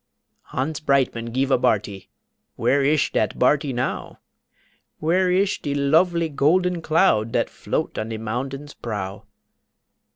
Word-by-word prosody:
Hans 145 Hz, +4 st, -3 dB
Breitmann 135 Hz, -6 st, 0 dB
gife 135 Hz, +3 st, 0 dB
a 125 Hz, -, +4 dB
barty 100 Hz, -4 st, -1 dB, 0.5 s
Where 140 Hz, +1 st, +2 dB
ish 150 Hz, +1 st, +2 dB
dat 110 Hz, -, 0 dB
barty 140 Hz, +2 st, +2 dB
now! 125 Hz, 0 st, -3 dB, 0.8 s
Where 180 Hz, +4 st, +1 dB
ish 190 Hz, +3 st, +1 dB
de 145 Hz, -1 st, -2 dB
lofely 165 Hz, +4 st, +2 dB
golden 170 Hz, +4 st, +1 dB
cloud 155 Hz, -, +2 dB
Dat -, -, 0 dB
float -, -, -3 dB
on 110 Hz, +1 st, -4 dB
de 110 Hz, -, -4 dB
moundain's 135 Hz, +6 st, -5 dB
prow? 100 Hz, -2 st, -6 dB
140 Hz, 130 wpm, -23 LUFS, 115-160 Hz, 0.8 s, a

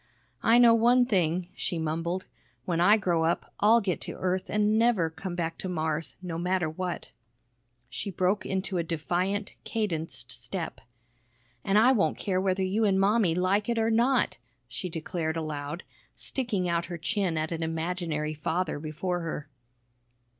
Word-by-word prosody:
"I 230 Hz, +1 st, +5 dB
know 240 Hz, -1 st, +7 dB
one 240 Hz, +2 st, +5 dB
thing," 180 Hz, -5 st, +1 dB
she 180 Hz, -3 st, -2 dB
mumbled. 165 Hz, +3 st, -2 dB, 0.4 s
"When 170 Hz, -1 st, 0 dB
I 205 Hz, +5 st, +6 dB
grow 175 Hz, -5 st, +1 dB
up, 165 Hz, +1 st, -1 dB
I'll 225 Hz, +3 st, +5 dB
get 185 Hz, -4 st, -1 dB
to -, -, -3 dB
Earth 185 Hz, 0 st, -1 dB
an' 210 Hz, +1 st, +2 dB
never 220 Hz, -9 st, +3 dB
come 180 Hz, +2 st, -6 dB
back 165 Hz, -1 st, -3 dB
to 185 Hz, -, -4 dB
Mars, 160 Hz, -2 st, -2 dB
no 170 Hz, -2 st, -4 dB
matter 180 Hz, -1 st, +1 dB
what!" 175 Hz, +3 st, -4 dB, 0.8 s
She 125 Hz, +10 st, -5 dB
broke 185 Hz, +2 st, +1 dB
into 190 Hz, -1 st, -2 dB
a -, -, +1 dB
defiant, 180 Hz, +5 st, -1 dB
cadenced 175 Hz, -8 st, -2 dB
step. -, -, -5 dB, 0.8 s
"An' 195 Hz, +1 st, +2 dB
I 235 Hz, +4 st, +6 dB
won't 225 Hz, -7 st, +2 dB
care 185 Hz, -2 st, 0 dB
whether 190 Hz, 0 st, +1 dB
you 200 Hz, +4 st, +1 dB
an' 195 Hz, -3 st, +3 dB
Mommy 195 Hz, -3 st, +3 dB
like 195 Hz, +4 st, +1 dB
it 235 Hz, -, +1 dB
or 225 Hz, 0 st, +2 dB
not!" 240 Hz, -, +2 dB, 0.3 s
she 180 Hz, -, -5 dB
declared 165 Hz, 0 st, -3 dB
aloud, 155 Hz, +1 st, -4 dB, 0.3 s
sticking 225 Hz, -9 st, -1 dB
out 170 Hz, 0 st, 0 dB
her 175 Hz, 0 st, -6 dB
chin 180 Hz, 0 st, -1 dB
at 155 Hz, +1 st, -1 dB
an 165 Hz, -1 st, -3 dB
imaginary 160 Hz, -1 st, -2 dB
father 160 Hz, +1 st, -2 dB
before 165 Hz, +4 st, -3 dB
her. 165 Hz, -3 st, -5 dB
180 Hz, 160 wpm, -28 LUFS, 165-205 Hz, 0.8 s, know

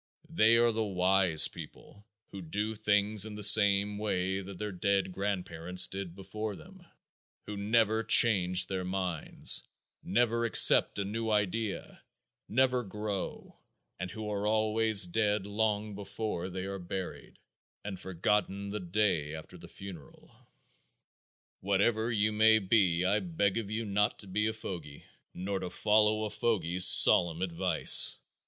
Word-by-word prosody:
They 115 Hz, -8 st, +3 dB
are 120 Hz, 0 st, +2 dB
the 110 Hz, 0 st, -3 dB
"wise" 95 Hz, -4 st, 0 dB
people 105 Hz, +2 st, -14 dB, 0.2 s
who 100 Hz, -, -9 dB
do 105 Hz, +6 st, -4 dB
things 105 Hz, -1 st, 0 dB
in 110 Hz, -1 st, -6 dB
the 105 Hz, -, -6 dB
same 105 Hz, -1 st, +4 dB
way 95 Hz, -2 st, -3 dB
that 95 Hz, -1 st, -11 dB
their 105 Hz, +1 st, -5 dB
dead 95 Hz, +1 st, -1 dB
grandparents 90 Hz, -2 st, -2 dB
did 95 Hz, -3 st, -8 dB
before 100 Hz, +2 st, -7 dB
them, 185 Hz, -, -16 dB, 0.6 s
who 105 Hz, -, -7 dB
never 110 Hz, +2 st, 0 dB
change 95 Hz, -5 st, +3 dB
their 95 Hz, -1 st, -5 dB
minds, 90 Hz, -3 st, -1 dB, 0.4 s
never 115 Hz, -1 st, -1 dB
accept 115 Hz, -, +5 dB
a 100 Hz, -, -3 dB
new 110 Hz, +3 st, -4 dB
idea, 105 Hz, 0 st, -3 dB, 0.5 s
never 130 Hz, +1 st, +1 dB
grow, 105 Hz, -2 st, -7 dB, 0.4 s
and 90 Hz, -, -5 dB
who 110 Hz, +1 st, -8 dB
are 105 Hz, 0 st, -3 dB
always 110 Hz, -1 st, +2 dB
dead 105 Hz, +2 st, -1 dB
long 105 Hz, 0 st, -3 dB
before 100 Hz, -2 st, -6 dB
they 95 Hz, +1 st, -6 dB
are 100 Hz, 0 st, -6 dB
buried 90 Hz, +1 st, -8 dB, 0.5 s
and 100 Hz, -3 st, -7 dB
forgotten 100 Hz, +2 st, -3 dB
the 105 Hz, -, -5 dB
day 90 Hz, -5 st, -2 dB
after 80 Hz, -, -12 dB
the -, -, -13 dB
funeral. 95 Hz, -7 st, -13 dB, 1.2 s
Whatever 105 Hz, +4 st, -1 dB
you 110 Hz, -1 st, 0 dB
may 110 Hz, +1 st, +4 dB
be 95 Hz, -4 st, 0 dB
I 100 Hz, +3 st, +1 dB
beg 95 Hz, +3 st, -2 dB
of 105 Hz, -3 st, -7 dB
you 110 Hz, +1 st, -4 dB
not 105 Hz, 0 st, -1 dB
to 100 Hz, -, -6 dB
be 105 Hz, +3 st, -2 dB
a 110 Hz, -, -3 dB
fogy, 85 Hz, -9 st, -9 dB, 0.3 s
nor 95 Hz, +2 st, -4 dB
to 90 Hz, -, -6 dB
follow 110 Hz, +2 st, +1 dB
a 105 Hz, -, -5 dB
fogy's 90 Hz, -5 st, +1 dB
solemn 85 Hz, 0 st, +6 dB
advice. 85 Hz, -3 st, +4 dB
100 Hz, 145 wpm, -29 LUFS, 95-110 Hz, 1.2 s, solemn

